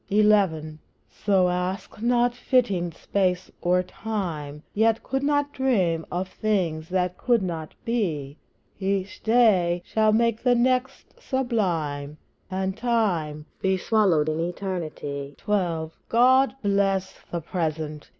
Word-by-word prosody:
XI. 195 -7 +2 0.3
So 190 -3 +2
ask 180 +4 -3
not 240 +1 +2
fitting 240 -9 +1
space 185 +2 -1
or 180 +1 +2
time, 170 -8 -5
Yet 225 +1 +2
could 270 +1 -2
not 290 0 +1
dream 185 -12 +1
of 180 +2 -2
things 175 -7 -1
which 180 -1 +1
could 235 -5 +2
not 165 -4 -5
be; 160 - -1 0.4
Each 195 0 -2
day 195 -7 +3
shall 215 -1 +2
make 230 0 +2
the 250 -1 +3
next 255 +2 -1
sublime, 170 - -1 0.3
And 190 0 -2
Time 190 -11 0 0.2
be 190 0 +2
swallowed 185 -7 +2
in 155 +1 -1
Eternity. 165 -6 -4
XII. 175 -7 -1 0.2
God 260 +3 +4
bless 195 -1 +1 0.2
the 170 - -1
Present! 155 -2 -3
190 Hz, 120 wpm, -25 LUFS, 165-225 Hz, 0.4 s, God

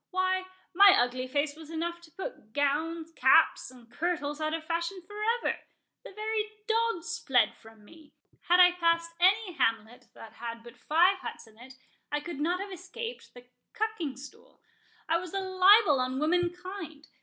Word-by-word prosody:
Why, 370 0 0 0.3
my 395 +2 +8
ugly 250 +1 0
face 285 +2 -1
was 315 -1 -12
enough 340 +1 -4
to 340 - -16
put 380 - -8
gowns, 315 +3 -1
caps, - - +4
and 250 -2 -16
kirtles, 295 +2 -3
out 310 0 -1
of 325 - -6
fashion 340 +3 -2
for 415 +3 -11 0.2
ever—the - - -7
very 430 +1 -2 0.2
dogs 450 -6 -1
fled 245 -5 +2
from 225 -2 -18
me—Had 325 - -3
I 360 0 +8
passed 335 -1 0
any 380 +2 +3
hamlet 225 -4 -1
that 225 - -12
had 230 0 -7
but 235 0 -13
five 350 +9 +3
huts - - -8
in 220 0 -21
it, 260 +2 -13 0.4
I 295 - 0
could 300 -1 -7
not 345 +4 0
have 395 0 -6
escaped 385 - -8
the 245 0 -13 0.3
cucking 430 - -3
stool.—I 335 - -7
was 360 +1 -8
a - - +1
libel 375 -3 +5
on 255 +1 -1
womankind. 350 0 -2
335 Hz, 160 wpm, -29 LUFS, 285-375 Hz, 0.4 s, my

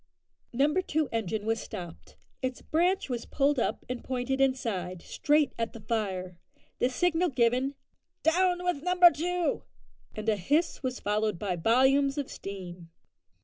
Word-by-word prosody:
Number 290 +9 +2
two 315 -4 -1
engine 220 -2 -2
was 225 0 0
stopped. 175 -5 -9 0.3
Its 255 -1 -3
branch 355 +4 +1
was 245 -3 -4
pulled 280 -1 +2
up - - -1
and 250 -1 -5
pointed 260 +1 -1
inside 205 -10 -1
straight 295 -2 +1
at 230 0 -2
the 230 - -9
fire; 190 -5 -3 0.4
the 245 - +3
signal 355 +6 +1
given, 255 +1 +1 0.5
"Down 360 +2 +2
with 355 -6 0
number 360 +1 +6
two!" 355 +2 -1 0.5
and 215 0 -6
a 215 -2 +3
hiss 290 - 0
was 255 -2 -3
followed 210 -1 0
by 190 -1 -2
volumes 265 - +3
of 285 -2 -3
steam. 180 -3 -8
255 Hz, 145 wpm, -29 LUFS, 215-300 Hz, 0.5 s, number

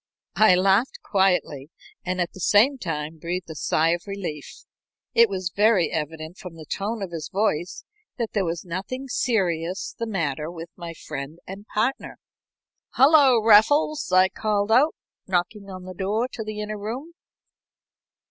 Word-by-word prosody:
I 215 -4 +6
laughed 195 +7 +2
quietly 180 - +1 0.3
and 185 0 -2
at 175 -1 -1
the - - -12
same 230 +9 +4
time 160 -4 -4
breathed 175 +1 -4
a - - -5
sigh 155 +2 +1
of 175 +3 -1
relief. 180 -7 -6 0.5
It 235 -1 +6
was 185 -3 -3
very 205 -4 +3
evident 160 +3 -5
from 180 -3 -9
the 160 -1 -11
tone 205 +6 -3
of 185 - -6
his 160 -2 -6
voice 180 -4 -1 0.3
that 230 -3 -2
there 200 - +1
was 170 0 -3
nothing 195 +10 -5
serious 185 -8 -1
the 230 - -4
matter 155 -7 -2
with 170 -1 -8
my 170 -2 -8
friend 140 +1 -7
and 195 +3 -9
partner. 230 +6 -2 0.8
"Hullo, 270 -4 +6
Raffles!" 280 +6 +4
I 185 0 +5
called 210 0 -1
out, 275 +8 +4 0.3
knocking 195 +3 -2
on 185 -1 -8
the 185 0 -8
door 205 +6 -1
to 225 - -6
the 215 0 -5
inner 210 0 -5
room. 250 +11 -6
190 Hz, 155 wpm, -24 LUFS, 170-220 Hz, 0.8 s, I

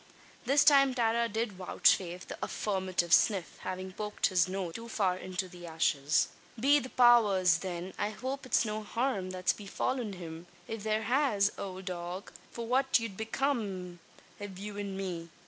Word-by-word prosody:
This 280 +2 +5
time 275 -3 +6
Tara 235 -1 +1
did 225 +1 -1
vouchsafe 180 -1 +1
the - - -6
affirmative 185 -4 -1
"sniff" 195 -6 +3
having 185 0 -5
poked 210 +1 -2
his 180 -1 +3
nose 185 -3 -3
too 230 +5 -8
far 195 -5 +1
into 185 0 -4
the 175 -1 -11
ashes. 155 -3 +1 0.3
"Be 285 +5 +5
the 255 - -7
powers! 205 -10 +5
then, 180 0 -5
I 205 - 0
hope 260 +5 -5
it's 240 - +3
no 215 0 -3
harum 215 -3 -1
that's 185 0 0
befallen 215 +2 -3
him! 170 -1 -8 0.2
If 225 -1 -5
there 215 +1 0
has, 225 -4 +2
owld 190 -1 -6
dog, 180 +1 -5 0.2
fwhat 255 +3 +2
'ud 205 -4 -7
become 215 -6 -2 0.4
av 200 -2 -7
you 205 +1 -7
an 200 -1 -4
me? 175 -4 -4
200 Hz, 160 wpm, -31 LUFS, 185-230 Hz, 0.4 s, time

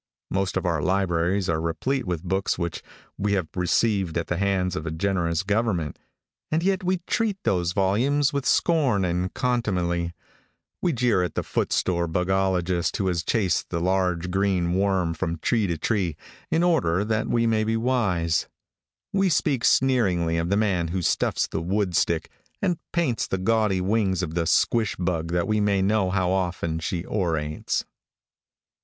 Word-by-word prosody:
Most 95 0 0
of - - -2
our 85 -4 0
libraries 95 +1 +1
are 80 -1 0
replete 125 +11 -1
with 85 -2 -2
books 95 +2 -1
which 85 -2 -3 0.4
we 100 0 +1
have 95 -5 0
received 95 -1 +1
at 85 - -1
the 90 - 0
hands 95 -2 0
of 80 -2 -4
a - - 0
generous 85 0 0
government, 100 - -1 0.5
and 160 +2 0
yet 195 0 +1
we 185 0 0
treat 220 -4 0
those 90 -2 +1
volumes 130 +10 +2
with 140 -1 -1
scorn 135 - +2
and 90 +1 -1
contumely. 90 -9 -1 0.7
We 175 - +2
jeer 120 - +2
at 90 -3 -2
the - - -1
footsore 85 -2 0
bugologist 90 0 0
who 100 - -1
has 85 -2 -1
chased 95 -6 0
the 85 - -2
large, 90 -1 0
green 95 -2 +1
worm 95 -3 +1
from 80 +1 -3
tree 110 +5 +1
to 85 -2 -2
tree, 90 -5 -1 0.3
in 165 +1 +2
order 100 - +2
that 110 0 0
we 115 -1 +1
may 110 -1 +2
be 110 +1 0
wise. 100 -10 +1 0.7
We 195 -1 +3
speak 140 -7 +1
sneeringly 95 -11 +2
of 85 +1 -1
the 100 - +2
man 95 -6 +1
who 90 +2 -2
stuffs - - +1
the - - -4
woodtick, 90 -3 0 0.3
and 180 -4 0
paints 160 -9 0
the 95 - -1
gaudy 105 -1 +1
wings 95 -2 +1
of 80 -3 -4
the 85 -1 0
squash 115 +4 +2
bug 85 -3 -1
that 85 -1 +1
we 110 0 +1
may 100 -2 +2
know 100 -1 +2
how 90 -1 +1
often 90 -3 -1
she 85 +2 -3
orates. 80 -6 -1
95 Hz, 165 wpm, -25 LUFS, 85-110 Hz, 0.7 s, We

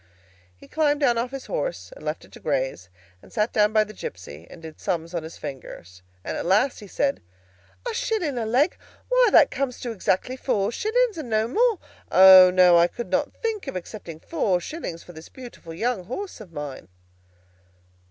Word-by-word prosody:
He - - -16
climbed 295 -1 +1
down 240 -4 +3
off 245 +2 -2
his 270 0 -7
horse, - - -4
and - - -14
left - - -4
it - - -22
to - - -13
graze, 130 -10 -2 0.3
and - - -18
sat 210 +2 0
down 210 0 +3
by 215 0 +4
the 215 0 -11
gipsy, 85 - -9
and - - -12
did 160 -1 -10
sums 170 -3 -3
on 170 - -2
his 160 +1 -10
fingers, 110 - -9 0.2
and - - -4
at - - -3
last 210 +8 +2
he 210 - -11
said, 275 +8 -1 0.7
"A 475 - -2
shilling 440 - -1
a 225 - -2
leg? 265 +9 +2 0.3
Why, - - +5
that 290 - +6
comes 260 -2 -3
to 240 - -4
exactly 220 +3 -1
four 210 -5 0
shillings, 440 - 0
and 275 -6 -6
no 220 0 +1
more. 455 - +2 0.3
O, 185 -1 +9
no; 180 -2 +6
I 170 - +5
could 240 - -7
not - - +1
think 440 -7 -2
of 270 - -5
accepting 175 -3 -7
four 180 +3 0
shillings 175 - -6
for 175 - -13
this 160 0 -12
beautiful 240 -10 -11
young 210 +2 -2
horse 365 - -6
of 190 -5 -12
mine." 145 -4 -7
215 Hz, 195 wpm, -24 LUFS, 170-285 Hz, 0.7 s, O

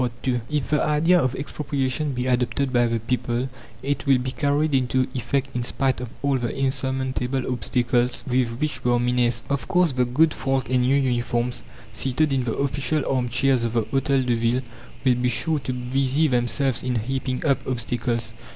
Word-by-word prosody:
II 125 -2 +1
If 150 -2 -2
the 150 - +3
idea 165 +4 +4
of 130 -1 0
expropriation 140 0 -2
be 125 0 -2
adopted 125 +1 0
by 120 -1 +4
the 115 0 0
people 120 +2 -1 0.3
it 140 +2 -2
will 135 -2 +6
be 125 +1 -3
carried 145 +3 +1
into 130 0 +2
effect 135 +2 -2
in 125 - 0
spite 130 +1 -1
of 125 - -5
all 140 -2 +2
the 120 -1 -1
"insurmountable" 130 -1 -1
obstacles 120 +1 0
with 125 -2 0
which 150 0 -2
we 120 - +2
are 120 - +3
menaced. 120 -1 +1
Of 140 -1 -2
course, 180 -3 +3
the 125 -1 +1
good 155 +6 +3
folk 135 -1 -1
in 125 -1 +3
new 130 +2 +3
uniforms, 120 -2 0 0.3
seated 135 +6 +1
in 130 -2 0
the 115 - -1
official 140 +2 0
arm 125 -2 0
chairs 130 +1 +2
of 115 -1 -1
the 115 -2 +2
Hôtel 135 +3 +1
de 125 - +2
Ville, 115 +2 +1 0.4
will 130 - +5
be 125 - +2
sure 150 +6 0
to 130 - -4
busy 130 +4 +1
themselves 125 0 +1
in 125 -1 -2
heaping 130 +4 -2
up 140 -3 +3
obstacles. 120 -2 -2
130 Hz, 190 wpm, -24 LUFS, 120-135 Hz, 0.4 s, will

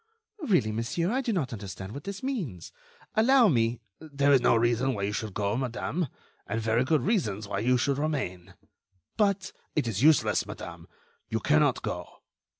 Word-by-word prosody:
"Really, 180 - +2
monsieur, 115 - -1
I 260 +3 +1
do 245 -3 -1
not 155 - -1
understand 95 -2 -7
what 140 - -8
this 200 +2 -6
means. 185 - -4 0.4
Allow 240 +1 +5
me—" 115 -4 +1 0.2
"There 140 -2 +1
is 135 - +5
no 120 - +4
reason 120 +3 +2
why 100 - -3
you 100 - 0
should 105 -2 -4
go, 100 +1 0
madame, 130 +6 -2 0.4
and 115 - -2
very 115 +2 +2
good 145 -1 +1
reasons 110 - 0
why 100 -1 -2
you 125 +4 +3
should 140 +3 0
remain." 95 - -3 0.6
"But—" 200 -3 +1 0.2
"It 150 -6 +1
is 110 -2 -2
useless, 155 +2 +4
madame. - - -8 0.4
You - - -1
cannot - - +2
go." - - -6
130 Hz, 170 wpm, -28 LUFS, 110-170 Hz, 0.6 s, Allow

